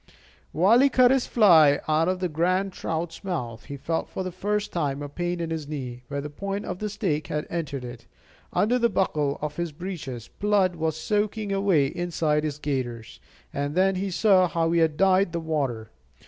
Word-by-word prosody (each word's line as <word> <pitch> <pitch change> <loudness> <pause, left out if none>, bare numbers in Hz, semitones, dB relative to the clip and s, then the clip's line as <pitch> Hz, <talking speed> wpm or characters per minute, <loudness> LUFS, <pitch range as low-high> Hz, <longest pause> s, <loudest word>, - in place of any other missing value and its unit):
While 195 +9 +4
he 275 +1 +5
cut 255 -1 +5
his 265 -2 +2
fly 160 -10 +6
out 155 +1 +2
of 185 0 0
this 180 -3 -1
grand 185 +4 0
trout's 165 +1 -4
mouth, 120 - -4
he 140 - -7
felt 160 +4 -2
for 190 - -4
the 185 - -4
first 205 +3 -2
time 145 -4 -1
a - - -4
pain 175 +4 -3
in 165 -1 -3
his 160 -3 -4
knee, 130 -5 -6
where 140 +1 -3
the 145 - -5
point 195 +6 -4
of 180 0 -5
the 215 - -2
stake 190 -8 -2
had 150 0 -2
entered 145 -6 -3
it. 120 -1 -10 0.4
Under 245 +4 +2
the 235 -1 +3
buckle 150 -8 0
of 150 0 -4
his 170 -2 -2
breeches 145 - -6
blood 200 -3 +2
was 160 -1 -1
soaking 210 +4 -1
away 195 -7 +3
inside 155 -1 -1
his 150 -2 -3
gaiters; 125 -6 -4 0.3
and 145 +2 -2
then 190 +1 +3
he 190 +1 -2
saw 185 -1 +4
how 165 -1 0
he 170 - +3
had 160 -2 +2
dyed 190 -2 +3
the 170 - -1
water. 140 -9 -2
165 Hz, 200 wpm, -25 LUFS, 150-195 Hz, 0.4 s, fly